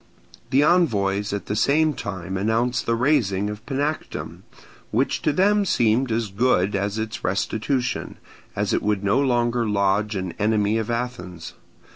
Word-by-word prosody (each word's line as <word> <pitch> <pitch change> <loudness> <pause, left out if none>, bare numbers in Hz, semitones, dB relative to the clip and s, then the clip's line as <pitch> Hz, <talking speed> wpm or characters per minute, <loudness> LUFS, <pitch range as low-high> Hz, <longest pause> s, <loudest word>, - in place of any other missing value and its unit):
The 135 +2 +4
envoys 105 - +2
at 100 -2 -3
the 105 - -3
same 150 +8 +3
time 95 -5 -5
announced 115 +5 0
the 115 - +2
razing 115 -7 +1
of 105 +1 -9
Panactum, 145 +4 -3 0.5
which 130 +5 0
to 155 - +2
them 205 +6 +3
seemed 120 - +2
as 110 -1 -1
good 100 -3 +2
as 100 +2 -1
its 110 0 -4
restitution, 115 +6 -1 0.4
as - - -1
it - - +1
would 105 -1 0
no 100 +6 +2
longer 120 -3 +1
lodge 105 +1 +1
an 95 -2 -3
enemy 105 +1 +2
of 110 - -4
Athens. 115 -8 -4
110 Hz, 150 wpm, -23 LUFS, 100-130 Hz, 0.5 s, The